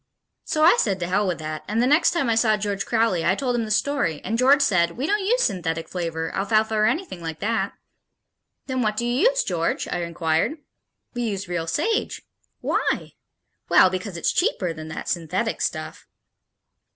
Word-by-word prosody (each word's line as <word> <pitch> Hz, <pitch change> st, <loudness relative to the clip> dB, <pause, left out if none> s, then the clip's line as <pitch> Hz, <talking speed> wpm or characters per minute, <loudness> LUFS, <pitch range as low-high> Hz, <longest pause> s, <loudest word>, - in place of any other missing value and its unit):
So 310 Hz, -, 0 dB
I 345 Hz, +8 st, +7 dB
said 195 Hz, -3 st, +1 dB
to 175 Hz, -, -1 dB
hell 190 Hz, +3 st, +1 dB
with 180 Hz, -, -1 dB
that 155 Hz, -1 st, -5 dB
and 215 Hz, +2 st, -1 dB
the 245 Hz, -, +3 dB
next 295 Hz, +6 st, +4 dB
time 335 Hz, -7 st, 0 dB
I 230 Hz, -, +2 dB
saw 225 Hz, -1 st, +3 dB
George 200 Hz, -1 st, -3 dB
Crowley 225 Hz, -7 st, +1 dB
I 190 Hz, -, +2 dB
told 250 Hz, +1 st, -1 dB
him 230 Hz, -2 st, 0 dB
the -, -, -7 dB
story 225 Hz, -, 0 dB
and 225 Hz, -, -2 dB
George 270 Hz, +4 st, +5 dB
said, 170 Hz, -8 st, +1 dB
"We 260 Hz, -, -2 dB
don't 410 Hz, +4 st, +1 dB
use -, -, +2 dB
synthetic 165 Hz, -5 st, -1 dB
flavor, 165 Hz, -2 st, -4 dB
alfalfa 215 Hz, +2 st, +1 dB
or 215 Hz, 0 st, +3 dB
anything 320 Hz, -, -2 dB
like 160 Hz, -1 st, -5 dB
that." 225 Hz, +2 st, -1 dB, 0.9 s
"Then 260 Hz, -1 st, -2 dB
what 215 Hz, -2 st, 0 dB
do 235 Hz, -, -1 dB
you 250 Hz, -, +3 dB
use, -, -, 0 dB
George?" 170 Hz, -3 st, -1 dB
I 175 Hz, -, -1 dB
inquired. 165 Hz, -, 0 dB, 0.6 s
"We 245 Hz, -, -3 dB
use 205 Hz, -4 st, -3 dB
real 170 Hz, -2 st, -3 dB
sage." 425 Hz, -, -1 dB, 0.4 s
"Why?" -, -, -1 dB, 0.6 s
"Well, 185 Hz, -, +6 dB
because 185 Hz, -1 st, -4 dB
it's -, -, +1 dB
cheaper 200 Hz, -, 0 dB
than 155 Hz, 0 st, -8 dB
that 160 Hz, -, -6 dB
synthetic 165 Hz, -3 st, -2 dB
stuff." -, -, -4 dB
210 Hz, 190 wpm, -23 LUFS, 170-255 Hz, 0.9 s, I